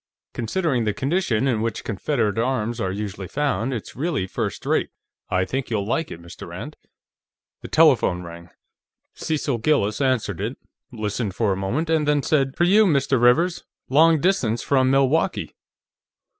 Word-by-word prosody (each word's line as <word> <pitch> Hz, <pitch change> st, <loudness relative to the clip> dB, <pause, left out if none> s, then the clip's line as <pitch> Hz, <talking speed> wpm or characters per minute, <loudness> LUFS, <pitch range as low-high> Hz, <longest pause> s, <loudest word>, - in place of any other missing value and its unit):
"Considering 125 Hz, +1 st, -1 dB
the 105 Hz, -2 st, -1 dB
condition 135 Hz, -, 0 dB
in 115 Hz, -5 st, +1 dB
which 115 Hz, -1 st, -3 dB
Confederate 110 Hz, 0 st, -1 dB
arms 120 Hz, -1 st, -1 dB
are 95 Hz, -, -1 dB
usually 100 Hz, -1 st, -5 dB
found, 135 Hz, -4 st, -1 dB
it's 120 Hz, -5 st, -6 dB
really 150 Hz, -, -1 dB
first 95 Hz, -, -4 dB
rate. -, -, +1 dB, 0.4 s
I 95 Hz, 0 st, +1 dB
think 135 Hz, +4 st, -3 dB
you'll 105 Hz, -4 st, -1 dB
like 160 Hz, +9 st, -1 dB
it, -, -, -8 dB
Mr. 85 Hz, 0 st, -11 dB
Rand." -, -, -8 dB, 0.9 s
The -, -, -7 dB
telephone 90 Hz, 0 st, +3 dB
rang, 85 Hz, 0 st, -10 dB, 0.6 s
Cecil 145 Hz, -5 st, -2 dB
Gillis 110 Hz, -4 st, +1 dB
answered 115 Hz, -8 st, 0 dB
it, 115 Hz, +6 st, -3 dB, 0.3 s
listened 105 Hz, -3 st, -3 dB
for 105 Hz, -4 st, +1 dB
a -, -, -2 dB
moment, 115 Hz, -, -2 dB
and 160 Hz, -2 st, +1 dB
then 145 Hz, -1 st, +2 dB
said: 135 Hz, -3 st, +1 dB
"For 170 Hz, -, +2 dB
you, 205 Hz, +4 st, +5 dB
Mr. 140 Hz, -5 st, +2 dB
Rivers; 165 Hz, +9 st, +3 dB, 0.3 s
long 160 Hz, +4 st, +5 dB
distance 135 Hz, -, +1 dB
from 130 Hz, -2 st, +2 dB
Milwaukee." 135 Hz, +4 st, +1 dB
125 Hz, 155 wpm, -23 LUFS, 105-150 Hz, 0.9 s, you